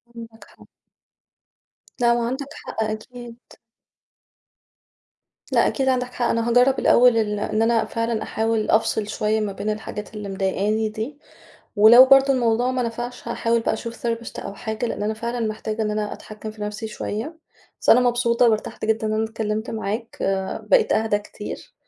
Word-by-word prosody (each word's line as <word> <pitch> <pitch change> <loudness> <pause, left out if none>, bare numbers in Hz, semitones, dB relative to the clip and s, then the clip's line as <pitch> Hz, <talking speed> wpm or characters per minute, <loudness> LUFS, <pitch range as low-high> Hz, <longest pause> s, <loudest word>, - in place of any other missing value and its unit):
عندك 230 -1 -11
حق. - - -20 1.3
لا 235 -1 +4
ما 240 - 0
هو - - -1
عندك 265 +4 -3
حق 220 - -4
أكيد. 230 +2 -7 2.1
لأ - - +4
أكيد 265 -1 -1
عندك 250 -1 -1
حق، 240 - -1
أنا 230 +1 0
هاجرب 250 +3 +4
الأول 245 -1 +5
ال 210 -2 0
إن 215 +1 -1
أنا 225 0 +2
فعلًا 230 -1 -2
أحاول 220 -1 -1
أفصل 220 -1 +2
شوية 215 +1 0
ما 210 -2 -2
بين 205 +2 -4
الحاجات 210 0 -5
اللي 210 -2 -6
مضايقاني 200 +3 0
دي، 225 +7 -6 0.6
ولو 230 +5 +9
برضه 270 +1 +6
الموضوع 245 -1 +1
ما 255 -1 -1
نفعش 240 +1 -5
هاحاول 235 0 0
بقى - - 0
أشوف 235 0 -6
therapist 230 0 -3
أو 200 - -6
حاجة 220 +3 -4
لأن 215 - -4
أنا 215 +1 -1
فعلًا 235 +1 -3
محتاجة 215 0 -3
إن 210 - -1
أنا 210 0 -2
أتحكم 215 0 -8
في 215 -1 -10
نفسي 210 +1 -4
شوية، 225 +8 -5 0.4
بس - - +2
أنا 245 - +7
مبسوطة 240 -1 +3
وارتحت 215 -1 -2
جدًا 220 0 0
إن 215 - -1
أنا 220 +1 +1
اتكلمت 220 0 -3
معاك 220 +1 -4
آآ 190 0 -1
بقيت - - +4
أهدى 220 -1 +1
كتير، 210 0 -9
225 Hz, 170 wpm, -22 LUFS, 215-240 Hz, 2.1 s, ولو